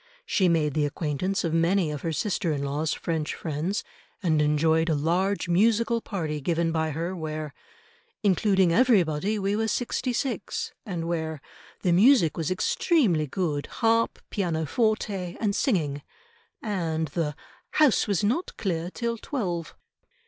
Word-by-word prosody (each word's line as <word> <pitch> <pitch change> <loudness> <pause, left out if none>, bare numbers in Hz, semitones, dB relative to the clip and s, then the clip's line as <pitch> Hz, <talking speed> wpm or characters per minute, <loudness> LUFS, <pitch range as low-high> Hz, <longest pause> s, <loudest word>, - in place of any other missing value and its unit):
She 195 - +2
made 155 -4 +2
the 150 0 +1
acquaintance 160 +6 -2
of 165 -2 -1
many 165 0 +2
of 150 - -5
her 165 - -2
sister 175 +2 -1
in 140 -2 -2
law's 145 +3 -1
French 160 -3 -2
friends, 165 +6 -2 0.4
and 155 -4 +3
enjoyed 160 +2 +2
a 160 - +2
large 180 +7 0
musical 230 +6 +2
party 160 -9 -3
given 165 +2 0
by 160 -1 0
her, 165 +5 -3
where, 155 -3 -5 0.7
"including 190 -2 +3
everybody 205 -4 +3
we 200 0 0
were 220 +1 0
sixty 250 +2 -1
six," 255 +2 -3
and 170 -4 -3
where 160 -2 -2 0.4
"the 180 - +3
music 195 - +5
was 160 -2 -2
extremely 225 - +2
good 150 -2 -2
harp, 230 -1 +1
pianoforte, 190 - -1
and 205 -3 0
singing," 155 - 0 0.6
and 165 -7 -1
the 150 -1 -2 0.4
"house 300 -6 +4
was 200 -3 0
not 250 - -1
clear 175 -4 -2
till 235 +3 -3
twelve." 175 - -3
175 Hz, 140 wpm, -26 LUFS, 160-205 Hz, 0.7 s, music